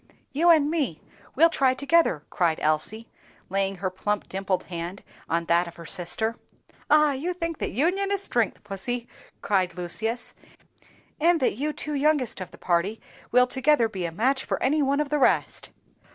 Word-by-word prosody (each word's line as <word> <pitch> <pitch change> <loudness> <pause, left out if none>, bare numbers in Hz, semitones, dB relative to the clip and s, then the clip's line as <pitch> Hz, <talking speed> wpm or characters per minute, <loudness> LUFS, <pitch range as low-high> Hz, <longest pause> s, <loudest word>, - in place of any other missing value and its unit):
"You 330 +5 +3
and 305 -3 +5
me, 280 - -1 0.4
we'll 330 +4 +5
try 260 -4 +2
together," 280 - +2
cried 170 -3 +1
Elsie, 155 +9 0 0.4
laying 195 +1 0
her 185 0 -3
plump 205 +3 -2
dimpled 190 -1 -2
hand 175 +2 -6 0.3
on 170 0 0
that 170 +1 +2
of 170 - -10
her 170 - -11
sister. 220 +8 -1 0.5
"Ah! 300 0 +5
you 300 +7 -2
think 335 -2 -4
that - - -2
union 365 - 0
is 400 -1 0
strength, 235 - -1
Pussie!" 230 +4 -4 0.4
cried 185 -4 +1
Lucius; 220 +7 -3 0.9
"and 335 +2 +4
that 260 - +2
you 300 +4 -1
two 300 0 -5
youngest 285 -7 +1
of 180 - -6
the - - -15
party 180 +5 0 0.3
will 250 +1 +6
together 265 -1 +2
be 190 -5 -4
a - - -6
match 260 +10 +1
for - - -2
any 295 +3 +2
one 280 +1 +1
of 295 - -3
the 300 0 0
rest." - - +1
235 Hz, 175 wpm, -25 LUFS, 185-295 Hz, 0.9 s, will